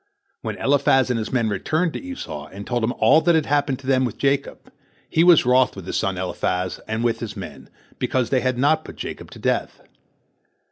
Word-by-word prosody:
When -, -, -4 dB
Eliphaz 135 Hz, -2 st, +3 dB
and 120 Hz, -, 0 dB
his 110 Hz, -, -4 dB
men 120 Hz, -3 st, +1 dB
returned 155 Hz, -, 0 dB
to -, -, -5 dB
Esau, 90 Hz, -, -7 dB
and 100 Hz, +1 st, -9 dB
told 120 Hz, -2 st, -1 dB
him 115 Hz, -, +1 dB
all 155 Hz, +4 st, +5 dB
that 170 Hz, +1 st, +3 dB
had 160 Hz, -2 st, +2 dB
happened 145 Hz, -2 st, +1 dB
to 135 Hz, -, -15 dB
them 130 Hz, -1 st, +2 dB
with 120 Hz, -5 st, -3 dB
Jacob, 140 Hz, 0 st, -1 dB, 0.4 s
he 160 Hz, -, +2 dB
was 175 Hz, -6 st, +6 dB
wroth 125 Hz, +1 st, +3 dB
with 95 Hz, -3 st, -9 dB
his -, -, -4 dB
son 95 Hz, -1 st, -1 dB
Eliphaz 90 Hz, 0 st, -2 dB
and 110 Hz, +1 st, -2 dB
with 120 Hz, -1 st, 0 dB
his 110 Hz, -3 st, -6 dB
men, -, -, -9 dB, 0.3 s
because 125 Hz, -3 st, 0 dB
they 130 Hz, -2 st, +2 dB
had 130 Hz, -1 st, 0 dB
not 155 Hz, +4 st, +2 dB
put -, -, -10 dB
Jacob -, -, -7 dB
to -, -, -12 dB
death. -, -, -2 dB
130 Hz, 215 wpm, -22 LUFS, 110-145 Hz, 0.4 s, was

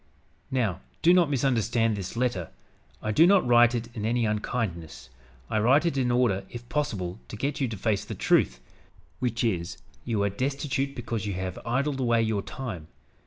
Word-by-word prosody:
"Now 110 Hz, -9 st, 0 dB, 0.2 s
do 175 Hz, -, +7 dB
not 175 Hz, -4 st, +4 dB
misunderstand 120 Hz, -4 st, +1 dB
this 95 Hz, +2 st, -6 dB
letter. 115 Hz, -9 st, -1 dB, 0.5 s
I 110 Hz, -, 0 dB
do 160 Hz, +11 st, +6 dB
not 195 Hz, -1 st, +5 dB
write 120 Hz, 0 st, +5 dB
it 115 Hz, -1 st, -3 dB
in 105 Hz, -, -4 dB
any 115 Hz, +1 st, +1 dB
unkindness. 105 Hz, -, -3 dB, 0.4 s
I 110 Hz, -, 0 dB
write 130 Hz, +9 st, +4 dB
it 170 Hz, -, +1 dB
in 130 Hz, -2 st, +1 dB
order, 120 Hz, -6 st, +2 dB
if 120 Hz, 0 st, -9 dB
possible, 105 Hz, -11 st, -2 dB
to -, -, -8 dB
get 140 Hz, +6 st, -2 dB
you 135 Hz, -, +2 dB
to 110 Hz, -3 st, -5 dB
face 105 Hz, 0 st, 0 dB
the -, -, -6 dB
truth, -, -, +2 dB, 0.6 s
which 120 Hz, -1 st, -1 dB
truth 105 Hz, -8 st, +1 dB
is, 85 Hz, -, -8 dB, 0.3 s
you 110 Hz, -4 st, 0 dB
are 100 Hz, -, +2 dB
destitute 140 Hz, +4 st, -2 dB
because 115 Hz, -3 st, -3 dB
you 100 Hz, -, -2 dB
have 95 Hz, 0 st, -4 dB
idled 135 Hz, +3 st, 0 dB
away 120 Hz, -3 st, +2 dB
your 110 Hz, -2 st, 0 dB
time. 100 Hz, -10 st, -6 dB
115 Hz, 185 wpm, -27 LUFS, 100-130 Hz, 0.6 s, do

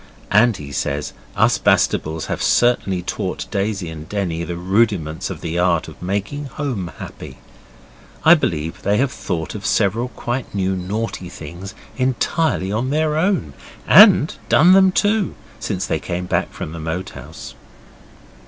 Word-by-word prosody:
And 110 Hz, +1 st, +4 dB
he 70 Hz, -1 st, -9 dB
says 70 Hz, +1 st, -2 dB, 0.2 s
us -, -, +3 dB
Bastables 80 Hz, +1 st, +1 dB
have -, -, -3 dB
certainly 100 Hz, -7 st, +2 dB
taught -, -, -3 dB
Daisy 100 Hz, -2 st, -1 dB
and 80 Hz, -1 st, -9 dB
Denny 90 Hz, -5 st, -2 dB
the 85 Hz, 0 st, -4 dB
rudiments 90 Hz, -3 st, 0 dB
of -, -, -7 dB
the 85 Hz, +1 st, -2 dB
art 90 Hz, -2 st, +2 dB
of -, -, -12 dB
making 100 Hz, +10 st, -3 dB
home 125 Hz, -, -4 dB
happy. 65 Hz, -, -9 dB, 0.9 s
I 160 Hz, -, +9 dB
believe 80 Hz, -, -1 dB
they 100 Hz, +1 st, +1 dB
have 135 Hz, +2 st, +1 dB
thought 85 Hz, -10 st, -4 dB
of 105 Hz, -, -7 dB
several 110 Hz, +4 st, +1 dB
quite 120 Hz, -2 st, -5 dB
new 95 Hz, -1 st, 0 dB
naughty 95 Hz, 0 st, -4 dB
things 85 Hz, +5 st, -9 dB, 0.2 s
entirely 130 Hz, -, 0 dB
on 120 Hz, +5 st, -1 dB
their 155 Hz, +1 st, +1 dB
own 160 Hz, -, 0 dB, 0.3 s
and -, -, +7 dB, 0.2 s
done 175 Hz, +5 st, +6 dB
them 190 Hz, 0 st, +6 dB
too 205 Hz, +1 st, +1 dB, 0.2 s
since -, -, -2 dB
they -, -, -1 dB
came 90 Hz, +1 st, -4 dB
back -, -, -1 dB
from -, -, -6 dB
the 85 Hz, -, -7 dB
Moat 80 Hz, +4 st, -4 dB
House. -, -, -10 dB
100 Hz, 155 wpm, -20 LUFS, 85-125 Hz, 0.9 s, I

